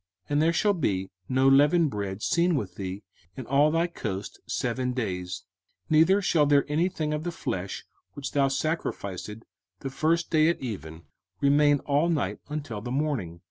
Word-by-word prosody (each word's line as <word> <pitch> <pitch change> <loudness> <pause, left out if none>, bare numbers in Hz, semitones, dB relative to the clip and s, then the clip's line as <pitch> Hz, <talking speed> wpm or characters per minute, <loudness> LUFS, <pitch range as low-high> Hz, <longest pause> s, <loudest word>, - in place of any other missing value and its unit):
05:016:004 - - -17
And 145 +1 +3
there 165 +1 +3
shall 205 +3 +3
be 95 - -1 0.2
no 130 +1 +3
leavened 145 +3 +5
bread 100 0 -4
seen 170 0 +2
with 100 -10 -3
thee 95 +1 -6 0.3
in 130 - -6
all 140 +4 +4
thy 165 +2 +2
coast 105 - -5
seven 125 +1 -1
days; 90 -7 -3 0.5
neither 170 +6 +5
shall 155 -5 +3
there 140 -1 +4
any 160 +5 +1
thing 155 -4 -2
of 150 0 -2
the 175 - -2
flesh, 95 - -4 0.3
which 140 -1 -5
thou 140 -1 +3
sacrificedst 115 - -3 0.4
the 135 - -4
first 160 +4 0
day 155 0 +4
at 170 - 0
even, 85 - -6 0.4
remain 145 0 +4
all 145 +4 +1
night 125 - -1
until 145 -8 -4
the 120 - -6
morning. 125 - -2
140 Hz, 175 wpm, -27 LUFS, 105-155 Hz, 0.5 s, leavened